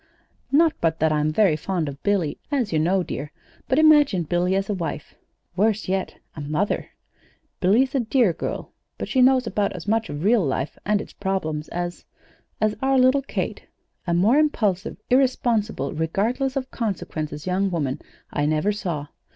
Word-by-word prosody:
"Not 315 Hz, +3 st, +5 dB
but 165 Hz, -1 st, +1 dB
that 160 Hz, 0 st, +3 dB
I'm 150 Hz, 0 st, +1 dB
very 185 Hz, -1 st, +3 dB
fond 165 Hz, 0 st, -2 dB
of 140 Hz, 0 st, -7 dB
Billy, 195 Hz, -7 st, 0 dB
as 250 Hz, -, 0 dB
you 155 Hz, -, +2 dB
know, 180 Hz, +4 st, +2 dB
dear; 150 Hz, -3 st, -5 dB, 0.4 s
but 260 Hz, -, +1 dB
imagine 295 Hz, -, +5 dB
Billy 175 Hz, +3 st, +1 dB
as 195 Hz, 0 st, 0 dB
a 210 Hz, -, -1 dB
wife 165 Hz, -4 st, -5 dB, 0.4 s
worse 210 Hz, +2 st, +1 dB
yet, 190 Hz, 0 st, -2 dB, 0.2 s
a 155 Hz, -, -6 dB
mother! 155 Hz, +8 st, -1 dB, 0.7 s
Billy's 230 Hz, +9 st, +3 dB
a 275 Hz, -, +2 dB
dear 235 Hz, -5 st, +2 dB
girl, -, -, -5 dB, 0.3 s
but -, -, -4 dB
she 260 Hz, -, +2 dB
knows 255 Hz, 0 st, +5 dB
about 210 Hz, -2 st, -1 dB
as 180 Hz, 0 st, -8 dB
much 225 Hz, +1 st, +1 dB
of 145 Hz, +2 st, -5 dB
real 215 Hz, 0 st, +4 dB
life 135 Hz, 0 st, -2 dB
and 210 Hz, 0 st, +2 dB
its -, -, -11 dB
problems 160 Hz, -6 st, -2 dB
as 175 Hz, 0 st, -4 dB, 0.6 s
as 215 Hz, -1 st, +1 dB
our 270 Hz, 0 st, +3 dB
little 260 Hz, +2 st, +4 dB
Kate. 275 Hz, -, -4 dB, 0.4 s
A 170 Hz, -, +1 dB
more 215 Hz, -, +4 dB
impulsive, 215 Hz, -10 st, 0 dB
irresponsible, 240 Hz, -, +1 dB
regardless 225 Hz, -, -1 dB
of 265 Hz, -1 st, -3 dB
consequences 155 Hz, -, -4 dB
young 190 Hz, +2 st, +1 dB
woman 145 Hz, -7 st, -2 dB, 0.3 s
I 145 Hz, 0 st, +1 dB
never 155 Hz, +7 st, +1 dB
saw. 175 Hz, -8 st, -3 dB
195 Hz, 170 wpm, -23 LUFS, 160-240 Hz, 0.7 s, Not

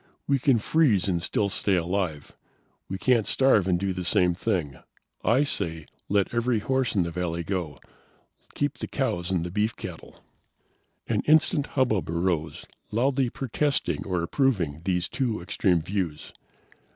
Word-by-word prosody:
We 140 Hz, -1 st, +2 dB
can 135 Hz, -2 st, +3 dB
freeze 110 Hz, -, +2 dB
and 85 Hz, -3 st, 0 dB
still 100 Hz, -, 0 dB
stay 100 Hz, 0 st, +1 dB
alive. 85 Hz, -4 st, -2 dB, 0.5 s
We 95 Hz, -, -3 dB
can't 115 Hz, +1 st, +2 dB
starve 120 Hz, -8 st, +3 dB
and 90 Hz, -2 st, +2 dB
do 95 Hz, 0 st, -1 dB
the 90 Hz, 0 st, -4 dB
same 90 Hz, 0 st, +3 dB
thing. 85 Hz, -, -2 dB, 0.4 s
I 125 Hz, +5 st, +4 dB
say, 80 Hz, -, -1 dB, 0.2 s
let 100 Hz, +1 st, +1 dB
every 120 Hz, 0 st, +1 dB
horse 130 Hz, +3 st, 0 dB
in 95 Hz, -, +3 dB
the 85 Hz, -, -4 dB
valley 85 Hz, 0 st, -2 dB
go. 85 Hz, -5 st, -3 dB, 0.8 s
Keep -, -, -1 dB
the -, -, -3 dB
cows 85 Hz, +1 st, -2 dB
and 90 Hz, -2 st, -1 dB
beef 105 Hz, +2 st, 0 dB
cattle." -, -, -10 dB, 0.8 s
An -, -, 0 dB
instant 155 Hz, 0 st, +4 dB
hubbub 110 Hz, -10 st, +1 dB
arose, 85 Hz, -1 st, -1 dB, 0.2 s
loudly 130 Hz, +3 st, +1 dB
protesting 140 Hz, +4 st, -1 dB
or 90 Hz, -3 st, -2 dB
approving 85 Hz, -, 0 dB
these 90 Hz, -2 st, 0 dB
two 120 Hz, -5 st, -1 dB
extreme 85 Hz, -1 st, +1 dB
views. 85 Hz, -5 st, -3 dB
95 Hz, 150 wpm, -26 LUFS, 85-120 Hz, 0.8 s, I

